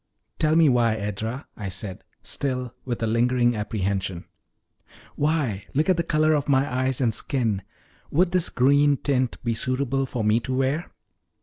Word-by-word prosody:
"Tell 155 0 +3
me 165 -1 +6
why, 120 -4 +3
Edra?" 110 +6 -4
I 100 -4 -5
said, 95 0 -7 0.2
still 125 -3 -2
with 120 -3 -3
a - - +3
lingering 120 +1 +2
apprehension. 95 -4 -2 0.9
"Why, 140 -10 0
look 155 +6 +2
at 185 - +4
the - - +2
color 155 -1 +2
of 145 -2 0
my 135 -1 +2
eyes 130 0 0
and 115 -3 +2
skin 115 -4 0 0.5
would 175 +4 +2
this 180 -2 +2
green 140 +2 +3
tint 130 -3 0
be 120 -1 0
suitable 130 +3 0
for 120 -3 -3
me 105 +2 +3
to 130 +2 -3
wear?" 135 +5 -1
125 Hz, 165 wpm, -24 LUFS, 110-140 Hz, 0.9 s, me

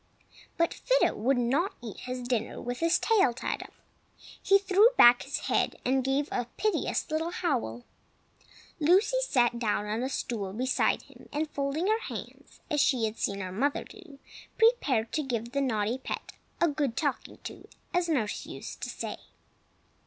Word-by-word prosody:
But 335 0 +2
Fido - - +2
would 255 +5 +1
not 280 - +1
eat 230 -4 -8
his 250 0 -5
dinner 235 -3 -1
with 245 +1 -4
his 335 +1 +3
tail 405 - +3
tied - - -3
up. - - -10 0.7
He 395 - +5
threw 395 +3 +5
back 240 0 +8
his - - -3
head, - - +1
and 260 +1 +2
gave 270 +2 +1
a 245 -1 -1
piteous 430 -6 0
little 320 +2 0
howl. 255 - -2 1.0
Lucy 385 +10 +4
sat 240 - +2
down 210 -3 0
on 215 +2 -2
a 260 - -1
stool 210 -7 -3
beside 255 +4 +1
him, - - -17
and 300 +1 -2
folding 280 +4 -1
her 435 +2 +2
hands, - - -9
as 295 -1 +3
she 250 -6 +3
had 220 0 -4
seen 200 0 -1
her 185 -1 -5
mother 275 +9 0
do, 350 -9 -14 0.4
prepared 305 - +3
to 310 - 0
give 235 -4 -3
the 280 +1 0
naughty 230 -2 0
pet - - -5 0.3
"a 340 - +4
good 285 -5 -1
talking 285 -4 -2
to," - - -9 0.3
as 355 -1 +1
nurse 235 -10 -1
used - - -8
to - - -3
say. - - -5
270 Hz, 170 wpm, -29 LUFS, 235-335 Hz, 1.0 s, back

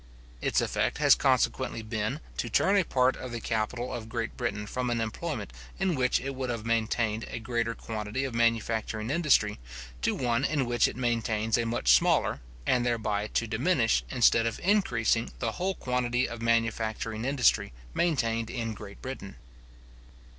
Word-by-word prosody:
Its - - +2
effect - - 0
has - - +6
consequently 65 - +1
been, 110 +6 -2
to - - -2
turn 195 - +3
a 195 - +4
part 130 -4 +2
of 130 - -7
the 120 - -4
capital 120 +3 -2
of 115 -2 -6
Great 115 0 -3
Britain 115 -4 -2
from 125 +4 -2
an 120 -1 0
employment 110 - -4 0.2
in 190 -2 +1
which 125 -4 +2
it 135 +2 -4
would 130 -1 -4
have 115 -2 -3
maintained 115 -1 0
a - - -5
greater 115 0 -2
quantity 110 +3 -4
of 135 -3 -3
manufacturing 115 -1 0
industry, 140 -10 +2 0.4
to - - +1
one 120 0 0
in 145 -3 +1
which 120 0 +3
it - - -5
maintains 115 -3 0
a 120 -1 0
much 115 - +2
smaller, - - +3 0.2
and 125 -1 +2
thereby 110 -3 0
to 115 - 0
diminish, 115 +2 +2
instead 115 -2 +4
of 115 - -3
increasing, 125 - +2
the 115 -2 -1
whole 185 +8 -2
quantity 125 0 0
of 120 -1 -7
manufacturing 115 -1 0
industry 135 - +2 0.2
maintained 115 -9 0
in 115 -3 -3
Great 100 -1 -11
Britain. 130 -7 -7
115 Hz, 165 wpm, -28 LUFS, 110-125 Hz, 0.4 s, has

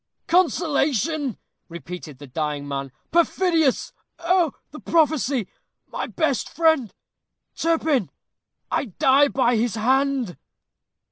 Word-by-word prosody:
"Consolation!" 310 - +1 0.3
repeated 170 -2 -8
the 145 - -11
dying 145 +1 -3
man; 135 -1 -4 0.2
"perfidious! 335 -3 +2 0.2
oh! 340 -2 +2 0.2
the 300 - -9
prophecy 290 - +1 0.4
my - - -5
best 315 -6 -1
friend 320 - +2 0.6
Turpin 320 - +1 0.6
I - - 0
die 275 - +3
by 250 -4 +2
his 230 0 0
hand." 260 -2 +1
275 Hz, 95 wpm, -23 LUFS, 210-320 Hz, 0.6 s, die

